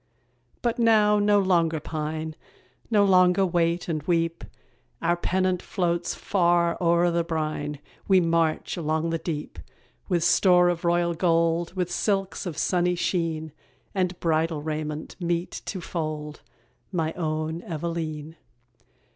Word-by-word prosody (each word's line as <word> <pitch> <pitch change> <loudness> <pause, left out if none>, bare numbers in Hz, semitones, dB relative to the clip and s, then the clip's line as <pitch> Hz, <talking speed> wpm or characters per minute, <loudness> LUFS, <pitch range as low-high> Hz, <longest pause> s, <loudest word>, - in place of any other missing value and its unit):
But 235 0 0
now 215 -2 +4
no 205 0 +4
longer 170 -5 +2
pine, 155 +1 -4 0.5
No 210 -3 +4
longer 185 0 +5
wait 170 -1 0
and 155 -3 -2
weep; 165 +1 0 0.6
Our 170 +1 +1
pennant 185 +1 0
floats 175 -1 -1
far 175 -3 +2
o'er 170 0 +3
the 170 0 +1
brine, 155 -3 -3 0.3
We 190 -1 +6
march 165 -2 0
along 160 0 -1
the 165 - -1
deep. 150 - -5 0.5
With 175 -3 +1
store 180 0 +5
of 175 -1 -2
royal 170 0 +2
gold, 165 +1 +1
With 180 -1 -2
silks 195 0 -1
of 165 - -5
sunny 180 -1 +1
sheen, 165 -3 -1 0.4
And 185 -2 -1
bridal 160 -2 0
raiment 155 0 -4
meet 175 0 -1
to 190 - -4
fold 155 -3 -5 0.5
My 165 -3 -1
own 155 0 -2
Eveleen. 160 -2 -5
170 Hz, 130 wpm, -25 LUFS, 160-180 Hz, 0.6 s, We